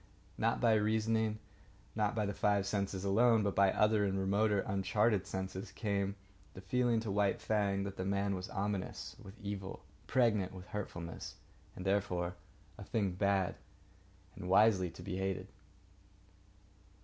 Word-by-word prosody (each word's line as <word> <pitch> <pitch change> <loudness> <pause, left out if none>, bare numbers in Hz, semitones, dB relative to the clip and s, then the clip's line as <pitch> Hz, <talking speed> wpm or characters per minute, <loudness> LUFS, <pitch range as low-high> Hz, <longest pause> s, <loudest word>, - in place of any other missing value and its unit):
Not 115 +1 +1
by 115 -2 +4
reasoning, 110 0 +1 0.6
not 105 0 +1
by 105 -2 +1
the 100 - -2
five 100 -1 +2
senses 100 -2 -2
alone, 110 +2 +4
but 100 -1 0
by 100 -1 +5
other 105 +1 +3
and 95 -1 0
remoter 100 +2 +2
and - - -8
uncharted 100 +1 +2
senses, 95 0 -4
came 100 -2 -1 0.4
the 95 - -8
feeling 120 +4 +2
to 110 -3 -3
White 100 0 +2
Fang 100 -2 +1
that 100 -1 -5
the 95 - -2
man 100 +1 0
was 90 -1 -4
ominous 100 -1 -3
with 100 +2 -12
evil, 100 -4 -6 0.2
pregnant 110 -7 +2
with 90 -1 -9
hurtfulness, 85 -5 -6 0.4
and 90 - -7
therefore 95 -3 0 0.5
a - - -6
thing 100 -4 0
bad, 95 0 +1 0.8
and 90 - -6
wisely 95 -2 +5
to - - -11
be 95 -2 -4
hated. 95 0 -2
100 Hz, 150 wpm, -34 LUFS, 95-105 Hz, 0.8 s, by